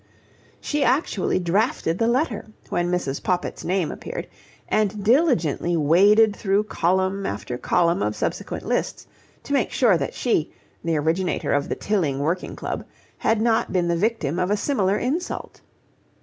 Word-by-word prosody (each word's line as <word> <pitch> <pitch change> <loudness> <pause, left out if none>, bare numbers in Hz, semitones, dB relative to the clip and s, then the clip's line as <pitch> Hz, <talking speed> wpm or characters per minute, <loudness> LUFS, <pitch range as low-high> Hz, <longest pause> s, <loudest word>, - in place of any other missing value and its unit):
She 295 -1 -1
actually 250 - +1
drafted 180 -1 0
the 230 - +2
letter, 240 -3 0 0.2
when 175 0 0
Mrs. 175 -6 -2
Poppit's 180 -1 -2
name 180 -2 0
appeared, - - -6 0.4
and 210 -1 0
diligently 205 - +2
waded 200 +8 +5
through 200 0 +1
column 190 0 0
after 110 +4 -4
column 175 +2 +2
of - - -1
subsequent - - -3
lists, - - -2 0.4
to 285 - -4
make 270 -4 +2
sure 225 -9 +3
that - - -3
she, 195 -11 0 0.3
the 165 -1 0
originator 165 +5 0
of 145 0 0
the - - -1
Tilling 175 -10 0
Working 160 +6 -2
Club, - - -4 0.4
had 225 -1 +2
not 225 0 +1
been 180 -2 +1
the 170 - +2
victim 175 -5 0
of 180 0 0
a 205 - +2
similar 205 -5 +1
insult. 310 +9 -3
190 Hz, 150 wpm, -23 LUFS, 170-225 Hz, 0.4 s, waded